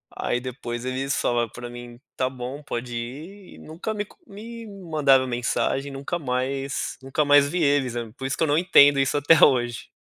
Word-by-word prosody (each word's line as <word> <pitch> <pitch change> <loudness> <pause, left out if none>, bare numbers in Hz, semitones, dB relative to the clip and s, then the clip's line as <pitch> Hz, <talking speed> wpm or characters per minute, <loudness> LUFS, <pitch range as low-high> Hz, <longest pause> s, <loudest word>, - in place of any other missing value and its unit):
Aí, 120 - -1
depois 125 -1 -6
eles 135 +2 -2
falaram 120 -2 0
pra 120 +1 -8
mim, 120 0 -10 0.2
tá 130 0 0
bom, 130 +3 -7
pode 120 -3 -5
ir, 155 +12 -8
e - - -15
nunca 170 +8 -6
me 205 0 -3
comu - - -23
me 230 +3 -9
mandaram 155 -9 +2
mensagem, 125 +3 -1
nunca 140 +6 -4
mais 135 0 -2
nunca 135 +3 -1
mais 145 0 +5
vi 175 +1 0
eles, 140 -4 +2 0.2
por 135 - -6
isso 135 - -3
que - - +1
eu - - +2
não 145 - +2
entendo 145 -5 +6
isso 135 +2 +1
até 145 +2 +5
hoje. 120 -2 +3
135 Hz, 190 wpm, -24 LUFS, 125-155 Hz, 0.2 s, entendo